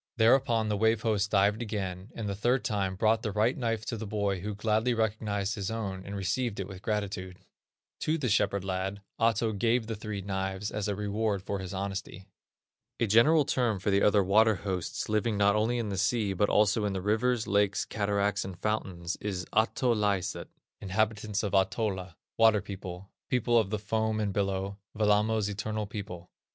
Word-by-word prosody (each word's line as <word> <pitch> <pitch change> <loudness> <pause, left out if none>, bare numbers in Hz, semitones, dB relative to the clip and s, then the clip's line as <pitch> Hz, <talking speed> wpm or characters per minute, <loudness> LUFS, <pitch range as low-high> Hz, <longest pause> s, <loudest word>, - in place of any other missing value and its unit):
Thereupon 115 -1 +4
the 105 -1 0
Wave 110 +1 +2
host 105 -3 +1
dived 105 +2 +3
again, 100 -3 -4
and 110 -3 -4
the 100 - -1
third 120 +6 +1
time 100 -4 -1
brought 110 +3 +2
the 110 -3 -2
right 110 +5 +2
knife 115 -3 -2
to 115 - -3
the 110 0 -5
boy 100 -2 -1
who 105 +3 -4
gladly 110 +3 +1
recognized 105 -2 -1
his 100 -4 -3
own, 100 -4 -4
and 100 +1 -7
received 105 +3 -1
it 95 - -3
with 95 -2 -9
gratitude. 100 -3 -3 0.6
To 155 +1 0
the 140 -5 -1
shepherd 100 -3 +1
lad 95 +1 -3 0.2
Ahto 115 -1 +2
gave 115 +3 +1
the 110 0 -4
three 105 -2 -5
knives 95 +1 -3
as 105 -1 -2
a 100 - -1
reward 105 -1 -1
for 100 0 -3
his 95 -2 -6
honesty. 95 -1 -5 0.7
A - - +3
general 135 +9 +5
term 120 -6 +1
for 95 +2 -1
the 100 +1 +3
other 105 -1 +4
water 110 +3 +4
hosts 95 -3 -3
living 110 0 0
not 100 0 +4
only 115 +3 +1
in 115 -3 -2
the 95 -2 -2
sea, 105 0 +1
but 105 +2 +1
also 105 +1 +3
in 100 -1 0
the 95 - -2
rivers, 110 +3 +1
lakes, 100 -1 +1
cataracts, 100 -1 0
and 95 -2 -7
fountains, 90 -5 -2
is 95 -3 -4
Ahtolaiset 110 -4 +1 0.3
(inhabitants 105 +1 -1
of 100 - -1
Ahtola), 95 -2 0 0.2
"Water 110 -2 +6
people," 95 -1 -8 0.2
"People 120 -1 +1
of 110 -4 +4
the 105 - -1
Foam 110 +1 -1
and 105 -2 -1
Billow," 100 0 -1 0.2
"Wellamo's 105 0 +2
Eternal 105 +1 -3
People." 100 -4 -7
105 Hz, 185 wpm, -29 LUFS, 100-110 Hz, 0.7 s, Water